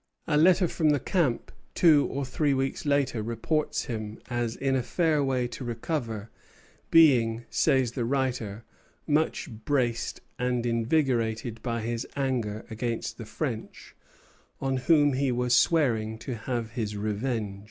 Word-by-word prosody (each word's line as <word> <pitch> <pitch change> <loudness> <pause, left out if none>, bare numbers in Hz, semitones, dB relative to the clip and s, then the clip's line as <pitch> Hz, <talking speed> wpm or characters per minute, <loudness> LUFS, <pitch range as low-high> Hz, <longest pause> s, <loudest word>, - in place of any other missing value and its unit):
A 150 - 0
letter 180 +4 +5
from 160 -2 +1
the 145 -1 +3
camp 150 -5 0 0.2
two 155 -5 +5
or 140 0 -3
three 140 +2 +1
weeks 135 +2 -2
later 140 -5 +1
reports 115 +8 -1
him 110 -4 -5
as 120 -1 -1
in 135 -1 0
a 130 - +2
fair 155 +2 +1
way 130 -2 0
to 130 - -7
recover, 115 -3 -4 0.6
being, 120 -8 +5
says 130 -6 +2
the 120 0 -2
writer, 120 -4 -1 0.4
much 155 +1 +1 0.2
braced 125 -4 0 0.2
and 125 -1 0
invigorated 115 -2 0
by 115 -2 -2
his 115 +2 -3
anger 120 -6 -2
against 115 +1 -3
the - - -6
French, - - -5 0.6
on 135 -1 0
whom 145 +2 +4
he 135 0 +1
was 125 0 +2
swearing 115 -10 +2
to 125 +3 -6
have 115 0 -3
his 110 -4 -3
revenge. 105 -1 -2
125 Hz, 140 wpm, -27 LUFS, 115-140 Hz, 0.6 s, letter